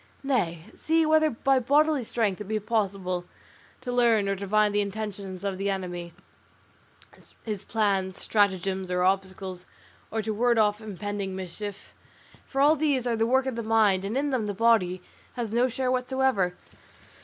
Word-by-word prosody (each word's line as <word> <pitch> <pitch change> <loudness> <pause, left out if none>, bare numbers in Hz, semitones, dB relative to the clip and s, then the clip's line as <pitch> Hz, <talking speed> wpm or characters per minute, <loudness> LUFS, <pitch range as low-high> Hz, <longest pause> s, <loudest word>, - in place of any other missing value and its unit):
Nay; 175 - -1
see 325 0 +2
whether 310 0 +4
by 270 +1 +2
bodily 290 +2 +3
strength 215 -4 -1
it - - -5
be 215 +1 -1
possible 195 -5 -1 0.6
to 255 -1 -4
learn 235 -4 +3
or 195 - +1
divine 205 +2 +1
the 205 0 +2
intentions 200 -2 -5
of 195 -2 -3
the 200 +1 0
enemy, 175 -3 -4 1.3
his 210 -4 -4
plans, 195 -4 0
stratagems, 190 -2 +1
or 180 0 +1
obstacles, 190 -1 -1 0.4
or 220 0 -2
to 220 +1 -2
ward 235 +2 +2
off 210 0 +2
impending 205 -2 -4
mischief; 190 +2 -7 0.5
for 270 - -1
all 295 +3 +6
these 285 -5 +1
are 240 -1 +1
the 225 0 +1
work 260 +2 +3
of 260 -3 -2
the 235 - -3
mind, 215 -4 +3
and 210 +6 -2
in 285 +1 0
them 240 -5 0
the 205 - -3
body 185 -5 +2 0.3
has 235 -4 -3
no 240 +3 +3
share 255 +1 -1
whatever. 255 -8 +1
210 Hz, 165 wpm, -27 LUFS, 190-245 Hz, 1.3 s, all